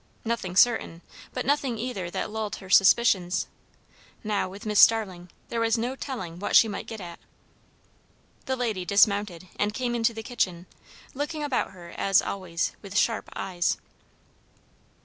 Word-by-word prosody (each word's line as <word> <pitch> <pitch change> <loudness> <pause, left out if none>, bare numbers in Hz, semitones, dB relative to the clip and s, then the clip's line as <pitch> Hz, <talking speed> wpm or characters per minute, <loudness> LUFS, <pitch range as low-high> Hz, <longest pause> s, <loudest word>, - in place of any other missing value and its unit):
Nothing 225 -6 -2
certain; 190 -6 +3 0.3
but 250 - -4
nothing 275 -3 +1
either 215 -7 -4
that 210 - -4
lulled 220 -1 -3
her 190 -1 -11
suspicions. 190 -2 +4 0.8
Now, 210 -3 -1
with 200 +3 -10
Mrs. 210 -1 -1
Starling, 190 -7 +4 0.2
there 235 - -2
was 230 0 +2
no 245 +3 -2
telling 190 - -6
what 205 - -1
she 225 - +8
might 205 - -5
get 225 - -7
at. 175 -3 -9 1.3
The 260 - 0
lady 225 -7 -2
dismounted 200 -2 +2
and 210 +1 0
came 250 -2 -1
into 230 -1 +1
the 225 - -6
kitchen, 185 -7 -2 0.5
looking 295 +3 -3
about 285 -4 0
her, 175 -2 -12
as 195 0 +3
always, 175 -4 -2
with 200 0 -5
sharp 225 +1 +1
eyes. 180 -2 -1
210 Hz, 150 wpm, -26 LUFS, 185-235 Hz, 1.3 s, she